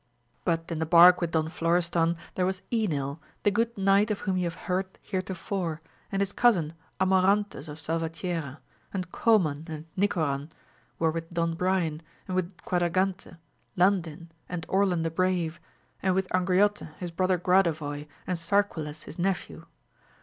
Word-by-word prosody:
But 165 -1 0
in 165 - -2
the 160 - -1
bark 175 +2 +8
with 170 - 0
Don 160 -1 +1
Florestan 170 0 +1 0.2
there 180 -1 +1
was 190 -1 -3
Enil, 155 - -1 0.2
the 205 - +4
good 230 +2 0
knight 195 +2 +4
of 210 - -2
whom 190 -2 0
you 180 -1 0
have 170 0 -3
heard 185 +1 -2
heretofore, 185 -3 -3 0.3
and 195 0 +1
his 200 - -3
cousin 180 -11 +3 0.3
Amorantes 190 -3 +2
of 150 +1 -8
Salvatierra, 165 -2 -3 0.3
and 180 -3 -4
Coman 165 -10 +2
and 155 -1 -6
Mcoran, 155 -7 0 0.5
were 160 -1 +2
with 165 +1 -5
Don 170 -1 0
Brian, 170 -3 0 0.3
and 185 - -3
with 185 0 -2
Quadragante, 180 +1 0 0.4
Landin, 175 -3 +1 0.2
and 175 -2 -4
Orlan 190 -4 +2
the 165 - -1
Brave, 180 -1 0 0.4
and 185 -1 +2
with 190 0 +1
Angriote 185 -2 +1
his 175 -2 -5
brother 185 +2 +1
Gradovoy 160 -5 +1 0.2
and 180 -2 -2
Sarquiles 165 -5 0
his 160 - -10
nephew. 190 +1 -2
175 Hz, 150 wpm, -28 LUFS, 165-190 Hz, 0.5 s, bark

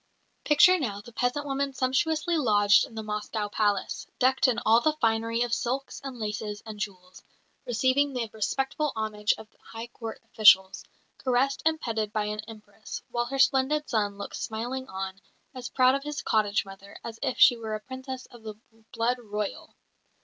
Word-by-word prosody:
Picture 355 +5 +6
now 210 -9 -3
the 215 +4 -12
peasant 250 +5 -1
woman 275 0 -1
sumptuously 310 +6 +1
lodged 205 -8 +4
in 225 - -14
the 220 - -4
Moscow 210 0 -3
palace, 205 -1 -1
decked 260 +1 +3
in 250 - +1
all 225 +2 +6
the 310 +2 +2
finery 230 -3 +1
of 240 -1 -2
silks 260 +3 -2
and 270 -2 -6
laces 210 -1 -4
and 215 -2 -8
jewels, 185 -3 -7 0.5
receiving 260 +4 +2
the 240 -3 -2
respectful 270 +7 -1
homage 215 -1 0
of 220 - -11
high 225 +1 -8
Court 230 -2 -8
officials, 190 -3 +5 0.4
caressed 265 +2 +1
and 320 0 +1
petted 220 -5 -2
by 215 -1 -1
an 210 0 -3
Empress, 215 -1 -9
while 240 0 0
her 270 +2 -4
splendid 275 +3 +3
son 205 -4 0
looks 200 - -6
smilingly 245 +4 -4
on, 190 0 -5 0.3
as 255 -2 -6
proud 255 -1 +4
of 275 - 0
his 295 0 -4
cottage 205 -2 +1
mother 195 +1 -12
as 225 -1 -7
if 265 -3 -1
she 245 - +7
were 220 -2 -4
a - - -4
Princess 260 +2 -7
of 240 - -14
the 215 -1 -7 0.4
Blood 240 +1 0
Royal. 210 -3 -5
230 Hz, 175 wpm, -27 LUFS, 210-260 Hz, 0.5 s, she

